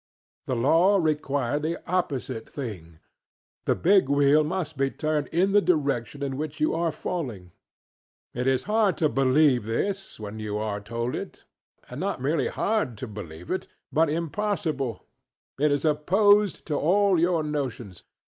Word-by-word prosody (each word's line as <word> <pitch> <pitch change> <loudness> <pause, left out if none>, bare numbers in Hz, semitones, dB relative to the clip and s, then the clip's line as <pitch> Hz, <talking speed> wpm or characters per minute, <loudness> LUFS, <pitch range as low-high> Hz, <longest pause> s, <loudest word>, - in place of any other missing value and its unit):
The 130 - 0
law 165 +11 +4
required 145 -4 0
the 165 +3 -2
opposite 145 -10 -2
thingŌĆöthe 90 - -7
big 190 -5 +5
wheel 145 +2 +4
must 160 -1 -3
be 135 0 +1
turned 155 0 -1
in 185 +4 +1
the 205 +1 +5
direction 140 - 0
in 135 -1 -3
which 155 +1 -5
you 155 - +2
are 165 0 0
falling. 125 - -5 0.8
It 125 +2 -2
is 130 -1 +2
hard 210 -2 +2
to 155 -3 +2
believe 135 -2 +3
this, 195 - -2
when 105 0 -7
you 105 -1 -3
are 105 -1 -3
told 115 +3 -3
it. - - -7 0.4
And - - -8
not - - -2
merely 140 +2 0
hard 205 - -1
to 130 - -6
believe 90 -6 -9
it, 185 - -2 0.3
but 160 0 +3
impossible; 160 - -2 0.5
it 150 +1 +3
is 145 +2 0
opposed 195 +7 +3
to 155 - -3
all 190 +3 +3
your 170 -1 +2
notions. 125 - -4
145 Hz, 150 wpm, -26 LUFS, 125-170 Hz, 0.8 s, big